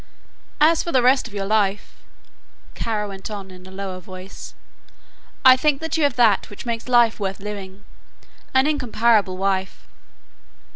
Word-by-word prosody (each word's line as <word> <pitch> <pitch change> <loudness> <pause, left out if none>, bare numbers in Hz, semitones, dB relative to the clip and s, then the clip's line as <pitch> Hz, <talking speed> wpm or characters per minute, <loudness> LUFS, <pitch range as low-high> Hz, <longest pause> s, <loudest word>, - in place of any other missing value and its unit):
"As 320 +2 +4
for 340 - -4
the 255 -4 +3
rest 260 +1 +3
of 220 - -15
your 195 -1 -3
life," 205 -1 0 0.8
Kara 215 -2 -2
went 195 0 -8
on 200 -3 -7
in 185 0 -13
a - - -12
lower 190 -1 -6
voice, 185 +1 -11 0.9
"I 260 0 +10
think 300 +4 0
you 325 - 0
have 285 -4 +2
that 225 -5 +3
which 205 - -10
makes 235 +1 -4
life 240 -3 +4
worth 195 -1 -3
living 200 -1 -8 0.7
an 265 +1 +3
incomparable 230 -9 +1
wife." 190 0 -2
210 Hz, 150 wpm, -22 LUFS, 195-250 Hz, 0.9 s, I